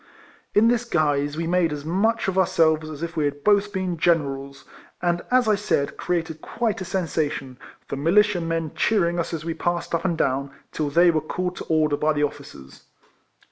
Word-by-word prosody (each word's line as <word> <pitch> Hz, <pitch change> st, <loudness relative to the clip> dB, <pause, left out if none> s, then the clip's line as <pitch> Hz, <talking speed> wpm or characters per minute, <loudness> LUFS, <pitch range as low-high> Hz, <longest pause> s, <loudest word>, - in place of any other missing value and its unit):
In 215 Hz, +2 st, +6 dB
this 240 Hz, 0 st, +2 dB
guise 145 Hz, -7 st, 0 dB
we 165 Hz, -, -2 dB
made 175 Hz, -1 st, +2 dB
as 145 Hz, -1 st, -5 dB
much 210 Hz, +7 st, +1 dB
of 190 Hz, -, -1 dB
our 190 Hz, -2 st, +3 dB
selves 160 Hz, -1 st, +2 dB
as 155 Hz, +1 st, -7 dB
if 170 Hz, 0 st, -5 dB
we 155 Hz, -2 st, +1 dB
had 145 Hz, 0 st, -3 dB
both 205 Hz, 0 st, +3 dB
been 185 Hz, -4 st, -3 dB
Generals, 140 Hz, -5 st, 0 dB, 0.3 s
and, 175 Hz, 0 st, 0 dB
as 250 Hz, -2 st, +3 dB
I 215 Hz, -, +4 dB
said, 200 Hz, -8 st, 0 dB
created 165 Hz, -3 st, -3 dB
quite 225 Hz, -4 st, -2 dB
a -, -, -4 dB
sensation, 150 Hz, -8 st, -2 dB, 0.3 s
the -, -, -4 dB
militia 185 Hz, +6 st, +3 dB
men 165 Hz, -2 st, -2 dB
cheering 175 Hz, -5 st, +1 dB
us 170 Hz, -, -2 dB
as 160 Hz, -2 st, -5 dB
we 165 Hz, -, -2 dB
passed 175 Hz, +1 st, -2 dB
up 170 Hz, -, 0 dB
and 175 Hz, -4 st, 0 dB
down, 140 Hz, 0 st, 0 dB, 0.2 s
till 150 Hz, -2 st, -2 dB
they 170 Hz, +4 st, +5 dB
were 155 Hz, -2 st, 0 dB
called 180 Hz, +3 st, -3 dB
to -, -, -6 dB
order 155 Hz, -2 st, +2 dB
by 155 Hz, +1 st, +1 dB
the 150 Hz, 0 st, 0 dB
officers. 140 Hz, -, -7 dB
165 Hz, 200 wpm, -23 LUFS, 150-185 Hz, 0.3 s, In